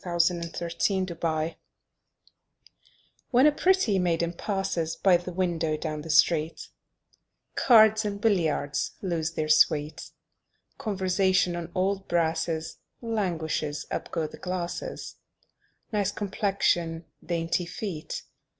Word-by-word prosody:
Y 175 -2 -3
Z 175 +1 +4
At 170 0 -6
the 175 +1 -1
Club 160 -1 -1 1.8
When 255 +2 +5
a 300 - +7
pretty 325 - +2
maiden 170 -1 0
passes 180 -4 -2
By 190 -2 +4
the 175 +1 -2
window 170 -4 0
down 155 -1 -4
the 165 - -9
street, 155 +1 +2 0.8
Cards 220 -3 +6
and 205 -1 -3
billiards 165 -9 0
lose 170 -3 -1
their 155 -2 -2
sweet; 155 0 +2 0.7
Conversation 185 -3 +1
on 170 0 -5
old 195 +1 0
brasses 160 -1 -1 0.2
Languishes; 170 -9 -2
up - - -3
go 165 -2 -1
the - - -8
glasses: 185 - -4 0.7
"Nice 205 -2 +1
complexion!" 190 -5 0 0.2
"Dainty 170 +1 -1
feet!" 175 -4 -5
175 Hz, 115 wpm, -27 LUFS, 165-195 Hz, 1.8 s, a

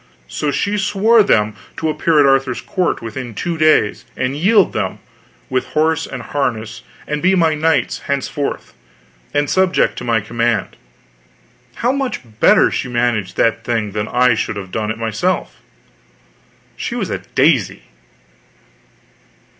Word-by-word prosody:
So 150 - -2
she 200 +9 -1
swore 210 +3 +4
them 105 - +2 0.2
to 160 - -1
appear 155 0 +2
at 145 - +6
Arthur's 135 -2 +2
court 180 -9 -1
within 115 0 -6
two 170 - -2
days 155 -9 +2
and 130 +2 -1
yield 195 +5 +3
them, - - -2 0.5
with 130 -1 -1
horse 160 +1 +2
and 125 -3 -7
harness, 115 -4 -3 0.2
and 150 0 -3
be 190 +2 +3
my 165 -3 +3
knights 155 0 +1
henceforth, 140 +1 -3 0.6
and 145 0 +1
subject 185 +4 +2
to - - -8
my 115 -2 +1
command. 115 0 -1 1.0
How 240 - +1
much 270 - -2 0.2
better - - +5
she - - -2
managed 120 -5 -1
that 115 - +1
thing 110 -3 -1
than 105 +1 -3
I 125 0 +3
should 110 - -2
have 95 -2 -7
done 105 +1 -2
it 110 - -3
myself! 115 - -2 1.2
She - - -4
was - - -3
a - - -2
daisy. - - +1
135 Hz, 145 wpm, -18 LUFS, 115-165 Hz, 1.2 s, at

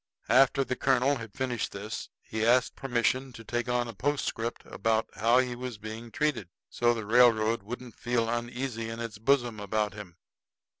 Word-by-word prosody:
After 135 +3 +5
the 130 - -2
colonel 135 +2 +2
had 115 -3 -9
finished 125 -3 -2
this, 105 +3 -6
he 110 0 -3
asked 125 +2 +3
permission 130 +1 0
to 115 - -10
take 120 +1 -2
on 120 0 +1
a 115 - -6
postscript 120 0 -2
about 110 +2 0
how 115 +3 +3
he 125 -1 +1
was 125 -2 -6
being 110 +2 -7
treated, 125 - -1 0.2
so 120 0 +2
the 110 -2 -4
railroad 115 -1 +4
wouldn't 120 +3 -7
feel 120 -1 0
uneasy 120 0 -3
in 115 0 -6
its 115 -3 -5
bosom 120 -2 +2
about 105 +1 -1
him. 100 -5 -10
120 Hz, 170 wpm, -29 LUFS, 110-125 Hz, 0.2 s, After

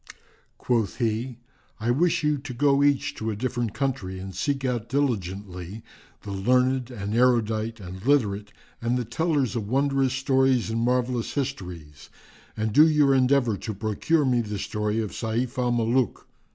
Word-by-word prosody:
Quoth 115 -5 0
he, 115 +1 -1 0.4
"I 115 +2 0
wish 165 +6 +2
you 150 -1 +1
to 135 -1 -7
go 140 +2 +3
each 145 -1 +2
to 110 - -4
a 110 - -2
different 120 -1 -2
country 125 -9 -2
and 95 +1 -7
seek 135 - -1
out 120 -3 -2
diligently 100 -7 -3 0.4
the 100 - -6
learned 125 +5 +1
and 105 -4 -5
erudite 115 -2 +2
and 95 0 -9
literate 105 -7 +1 0.3
and 120 +2 0
the 125 - -2
tellers 140 - 0
of 105 -3 -3
wondrous 135 0 +1
stories 130 -3 +2
and 115 +1 -1
marvellous 125 0 0
histories 90 - -5 0.5
and 110 -1 -1
do 155 +5 +7
your 150 -3 +4
endeavour 130 -4 +3
to 110 +3 -5
procure 115 +9 0
me 125 -2 +2
the 105 -2 -4
story 105 +2 -2
of 110 -3 -2
Sayf 115 +3 -2
al 125 -1 +1
Mulúk. 120 0 0
120 Hz, 160 wpm, -25 LUFS, 105-135 Hz, 0.5 s, do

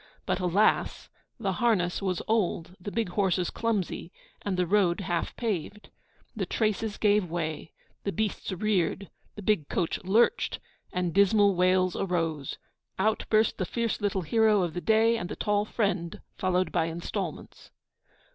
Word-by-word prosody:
But - - 0
alas! 185 +4 +1 0.3
the 200 -4 0
harness 185 -3 +1
was 185 -3 -1
old, 185 -5 0
the 205 - -5
big 225 -3 -1
horses 185 -2 +1
clumsy, 210 -6 -2 0.3
and 195 -3 -2
the 180 - +2
road 190 -1 +2
half 175 -3 -2
paved. 210 -2 -4 0.4
The - - -2
traces 215 -1 -1
gave 205 -4 +2
way, 160 -2 -4 0.3
the 200 - -1
beasts 215 -1 -2
reared, 195 0 0 0.2
the 210 - -8
big 185 -8 +1
coach 175 0 -1
lurched, 220 - +2 0.3
and 180 -2 -1
dismal 200 +1 +5
wails 185 0 +2
arose. 165 -6 -2 0.4
Out 215 +3 +1
burst 215 0 +3
the - - +1
fierce 235 -2 -2
little 200 -2 0
hero 215 +3 +3
of 170 -3 -2
the 175 - -4
day, 225 +2 +3
and 175 - -5
the - - -4
tall 205 0 +1
friend 195 -6 -1 0.2
followed 185 0 0
by 170 -2 +1
instalments. 165 +1 -5
190 Hz, 150 wpm, -28 LUFS, 175-215 Hz, 0.4 s, dismal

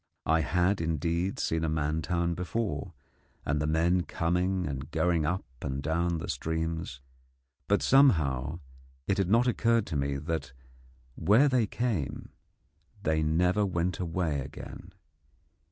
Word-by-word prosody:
I 80 +1 +3
had, 90 +4 +1
indeed, 85 +3 -1
seen 80 0 -1
a 80 - +1
man 75 0 0
town 85 +1 0
before, 95 0 -3 0.5
and 75 +1 0
the 75 - 0
men 85 +3 +2
coming 90 +2 0
and 70 -2 -4
going 85 -4 +1
up 90 +4 -1 0.2
and 65 0 -3
down 85 +3 0
the 80 - -5
streams, 80 -1 -3 0.7
but, - - +2
somehow, 80 - +3 0.4
it 100 - 0
had 95 -2 +1
not 115 +4 +4
occurred 115 -2 +2
to - - -5
me 70 0 0
that 75 -3 -4 0.6
where 105 - +4
they 125 -5 +2
came 105 - -2 0.7
they 80 0 +1
never 90 +6 +2
went 90 -2 -1
away 85 -4 -1
again. 70 +6 -9
85 Hz, 135 wpm, -29 LUFS, 80-95 Hz, 0.7 s, not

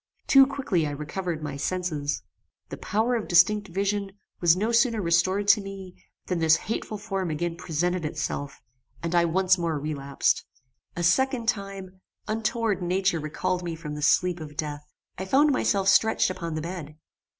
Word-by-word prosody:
Too 270 -1 +7
quickly 260 - -1
I - - -3
recovered 155 +2 -4
my 145 -2 -4
senses. 150 -3 -2 0.5
The - - -6
power 220 +4 0
of 230 -3 -1
distinct 205 +4 +4
vision 200 +2 -1 0.3
was 170 0 +4
no 215 +4 0
sooner 235 -1 +3
restored 185 +3 +1
to 205 +1 +6
me, 195 -2 -8 0.3
than 180 -2 -2
this 160 -1 +5
hateful 215 +2 -4
form 195 -3 -3
again 165 +2 -2
presented 175 +1 -1
itself, 145 -2 -4 0.4
and 170 +1 -2
I 170 -1 +4
once 185 +2 +2
more 165 -3 -1
relapsed. 140 -2 -1 0.5
A 175 - -3
second 250 +6 +2
time, 195 -4 -3 0.3
untoward 220 -1 -1
nature 185 0 +1
recalled 155 +4 -2
me 170 -2 -4
from 155 -2 -7
the 150 - -6
sleep 175 +4 +2
of 150 -2 -9
death. 150 -1 -5 0.3
I 190 - -3
found 285 +9 +4
myself 200 -7 +1
stretched 210 0 +4
upon 170 -3 -5
the 155 - -2
bed. 165 -3 -6
180 Hz, 165 wpm, -26 LUFS, 160-200 Hz, 0.5 s, Too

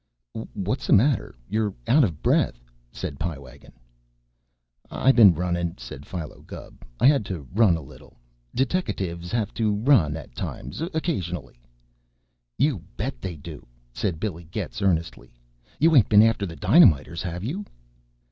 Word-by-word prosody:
"What's 100 +8 -3
the - - +4
matter? 120 - +2
You're 105 -1 -1
out 145 +4 +5
of 85 - -2
breath," - - +2 0.3
said 70 +2 -6
Pie 80 -2 -3
Wagon. 65 -3 -15 1.2
"I 135 - +3
been 105 -9 +7
runnin'," 85 0 -2
said 65 +3 -10
Philo 85 -5 -7
Gubb. - - -12 0.2
"I - - +3
had 140 -4 +5
to 80 -9 -6
run 100 -5 +4
a 80 - -8
little. - - -16 0.4
Deteckatives 95 - -2
have 115 -4 -1
to 110 -3 0
run 105 - +3
at 65 - -11
times 70 - -6
occasionally." 90 - -3 1.0
"You 135 - +1 0.2
bet 130 +5 -4
they 90 -3 -5
do," 75 +1 -10 0.3
said 85 - -2
Billy 85 -5 -4
Getz 60 -6 -5
earnestly. 85 -9 -1 0.4
"You 160 +1 +4
ain't 125 - +5
been 105 0 +7
after 110 -3 +2
the 85 - -8
dynamiters, 85 - +4
have 90 0 -5
you?" 165 - -3
95 Hz, 145 wpm, -24 LUFS, 80-115 Hz, 1.2 s, been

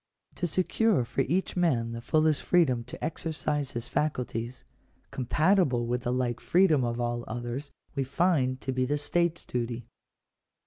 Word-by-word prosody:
To 175 - 0
secure 185 - +2
for 120 +3 -1
each 175 +8 0
man 135 -11 +1
the 115 0 -5
fullest 155 +3 +2
freedom 130 -10 +3
to 125 - -9
exercise 150 -3 -2
his 120 0 -4
faculties, 125 -3 -2 0.5
compa 150 +9 +2
tible 130 -11 +2
with 125 +1 -1
the 120 - -1
like 125 -2 0
freedom 170 -5 +4
of 120 0 -1
all 120 0 -1
others, 120 +5 -4 0.2
we 135 - 0
find 135 -2 +1
to 130 - -2
be 130 0 0
the 145 +2 +1
state's 170 +3 0
duty. 120 -1 -3
130 Hz, 155 wpm, -28 LUFS, 120-160 Hz, 0.5 s, freedom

